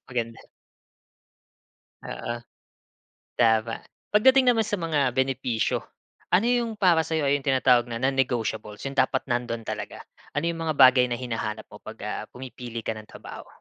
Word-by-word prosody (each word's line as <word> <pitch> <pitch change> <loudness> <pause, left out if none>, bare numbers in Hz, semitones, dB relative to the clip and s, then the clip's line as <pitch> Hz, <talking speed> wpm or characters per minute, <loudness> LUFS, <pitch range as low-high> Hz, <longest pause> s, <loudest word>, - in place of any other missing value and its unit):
maganda. 115 -2 -3 1.6
Oo. 120 - -5 1.0
Tama. 115 -1 +3 0.3
Pagdating 260 +4 +6
naman 225 -3 +2
sa 210 - -1
mga 150 -8 0
benepisyo, 130 -3 0 0.6
ano 200 +6 +4
yung 235 -1 -2
para 170 -6 +3
sa'yo 160 -1 0
ay 140 +1 +3
yung 135 - -15
tinatawag 130 -2 +4
na 115 0 -5
non-negotiables, 120 -6 -1
yung 135 0 -5
dapat 130 0 +2
nandun 120 -1 -1
talaga 105 -1 -6 0.3
ano 145 - -1
yung 165 -1 -5
mga 155 - 0
bagay 130 -2 +7
na 120 - -2
hinahanap 115 -3 -4
mo - - -11
pag, - - -10
ah, - - -3
pumipili 125 -2 -7
ka - - -2
ng 110 - -11
trabaho? - - -10
130 Hz, 150 wpm, -26 LUFS, 115-155 Hz, 1.6 s, bagay